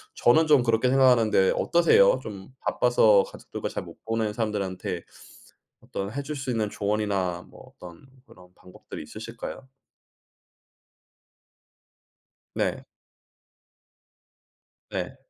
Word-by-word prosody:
저는 155 +7 +4
좀 145 -5 +5
그렇게 115 +1 +2
생각하는데 125 -7 +4
어떠세요? 475 - +4
좀 95 -2 -8
바빠서 110 -5 +4
가족들과 - - -7
잘 - - -5
못 - - -13
보는 115 -1 -1
사람들한테 100 -5 -3 0.8
어떤 100 +2 -6
해 140 - -3
줄 150 +2 -5
수 135 -1 -3
있는 110 -3 -1
조언이나 100 -4 -1
뭐 - - -16
어떤 85 +5 -13 0.2
그런 90 0 -17
방법들이 90 - -11
있으실까요? 115 - -8 2.9
네. - - -2 2.0
네. - - -4
110 Hz, 230 characters per minute, -26 LUFS, 100-125 Hz, 2.9 s, 좀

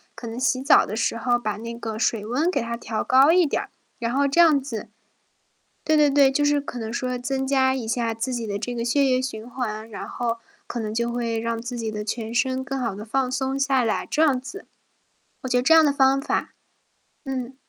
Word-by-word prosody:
可 235 - -8
能 225 +1 -6
洗 255 0 +1
澡 280 +3 +5
的 - - -7
时 230 0 0
候 240 +1 +1
把 215 -3 -2
那 230 +1 -6
个 220 -2 -5
水 220 -2 0
温 280 +10 0
给 280 - 0
它 235 0 -3
调 225 -2 -4
高 270 +4 +5
一 355 -1 +5
点 285 - -1
儿， - - -10 0.3
然 235 +1 -2
后 280 +1 +2
这 335 +5 +4
样 310 -4 +6
子 230 -5 -6 1.0
对 310 0 +3
对 295 -1 +5
对， 275 -1 +5
就 290 +2 +1
是 290 0 +3
可 250 -3 -7
能 220 0 -5
说 250 +1 -2
增 265 +2 -2
加 265 -1 +3
一 255 -4 -4
下 230 0 -1
自 245 +3 -3
己 230 -3 -4
的 200 - -2
这 245 +4 -4
个 235 -1 -3
血 275 +4 +2
液 255 -1 +2
循 235 -3 -5
环， 225 -3 -4
然 215 - -7
后 235 -1 -2 0.3
可 240 - -4
能 215 -1 -3
就 235 +1 -1
会 235 -2 -2
让 230 0 -3
自 240 0 -5
己 220 -1 -3
的 210 - -4
全 225 +1 -4
身 260 +1 0
更 270 0 -4
好 230 -6 -2
地 210 - -7
放 255 +3 -1
松 265 +1 -1
下 270 -2 +2
来， 220 - 0
这 305 - 0
样 280 -5 +4
子。 390 +10 -10 0.8
我 260 - -5
觉 250 - +2
得 - - +3
这 300 +6 +4
样 320 - +8
的 295 - +4
方 275 -1 +3
法 - - -2 0.7
嗯。 260 -2 -5
250 Hz, 260 characters per minute, -24 LUFS, 230-270 Hz, 1.0 s, 样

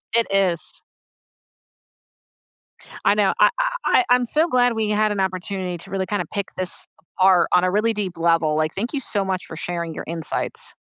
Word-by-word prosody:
It 230 -1 +3
is. 185 -5 0 2.2
I 200 - +5
know, 205 -2 +2
I - - +7
I - - +2 0.2
I 370 - +4
I'm 250 0 +4
so 310 +7 +2
glad 245 -5 +3
we 220 -2 -1
had 210 0 +2
an 205 - -2
opportunity 185 -1 -2
to 195 - -12
really 190 -1 -1
kinda 205 +1 -2
pick 200 -2 -2
this 185 -1 -3 0.3
apart 185 -2 +5
on 180 - +5
a 185 - +2
really 215 +3 +2
deep 200 -4 -3
level, 165 -2 +2
like, 155 0 0
thank 230 +8 -3
you 285 - -1
so 205 -5 -1
much 185 -1 -2
for - - -9
sharing 170 -1 -4
your - - -7
insights. 165 -2 -3
195 Hz, 190 wpm, -22 LUFS, 175-215 Hz, 2.2 s, I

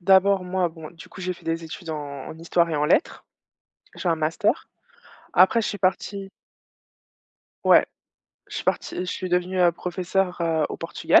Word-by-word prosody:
D'abord 190 +1 +5
moi 180 -1 0
bon, 160 -2 -10
du 170 - -13
coup 190 - -11
j'ai 185 0 -1
fait - - -16
des 165 0 -1
études 160 +1 -7
en 145 -3 -6
en 160 - -9
histoire 170 0 +2
et 155 - 0
en 145 - +1
lettres. 265 - +1 0.7
J'ai 180 - -2
un 165 - +4
master. 155 +1 0 0.7
Après 190 +6 +6
je - - -1
suis 205 - -4
partie 195 +1 -1 1.3
ouais. - - +6 0.6
Je - - -9
suis - - -4
partie, - - -1
je 180 - -2
suis 185 0 -4
devenue, 180 +1 0
heu, 175 -1 +6
professeure, 180 +1 -2
heu, 160 -2 +1
au - - -4
Portugal - - +3
180 Hz, 180 wpm, -24 LUFS, 165-185 Hz, 1.3 s, Après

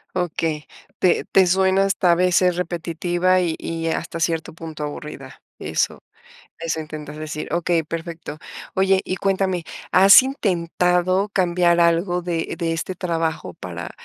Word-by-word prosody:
Okey, 165 -4 -2 0.3
te 185 - +2
te 190 - +6
suena 190 +1 +3
hasta 195 -2 +2
a - - +5
veces 180 0 +3
repetitiva 175 +1 0
y 170 -3 -1
y 165 0 -3
hasta 165 +1 -3
cierto 165 -1 -1
punto 160 -2 -7
aburrida, 145 -2 -8 0.2
eso 80 +1 -1 0.6
eso 165 -1 -2
intentas 150 -1 -8
decir, 155 0 -6
okey, 170 -1 +1
perfecto, 165 -1 -6 0.4
oye, 190 0 +3
y 185 - -3
cuéntame, 190 -2 0 0.3
¿has 195 +6 +9
intentado 185 -5 0
cambiar 175 -3 +2
algo 170 +1 +2
de 170 -2 -3
de 165 -2 -1
este 165 +3 -4
trabajo 165 - -2
para 85 -2 -7
170 Hz, 135 wpm, -22 LUFS, 160-185 Hz, 0.6 s, has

